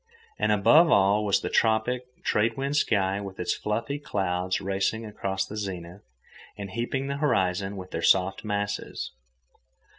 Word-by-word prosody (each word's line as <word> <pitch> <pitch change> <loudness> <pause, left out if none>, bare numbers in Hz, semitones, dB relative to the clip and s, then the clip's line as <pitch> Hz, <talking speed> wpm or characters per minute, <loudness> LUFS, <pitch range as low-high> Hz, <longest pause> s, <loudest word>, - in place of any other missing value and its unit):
And - - +2
above 150 - +6
all 100 -3 +4
was 100 -1 +2
the - - -3
tropic, 120 +3 +1 0.2
trade 110 +2 +1
wind 140 +2 -2
sky 100 -7 +1
with 95 -1 -8
its 90 - 0
fluffy 115 +7 -3
clouds 95 -7 -1
racing 100 +4 -1
across 95 -2 -3
the 105 - -8
zenith 95 -3 -6 0.6
and 100 -2 -6
heaping 120 +4 -2
the 140 0 -3
horizon 95 -8 0
with 90 -1 -8
their 80 - -3
soft 95 +2 +3
masses. 105 -1 -3
100 Hz, 150 wpm, -26 LUFS, 95-115 Hz, 0.6 s, above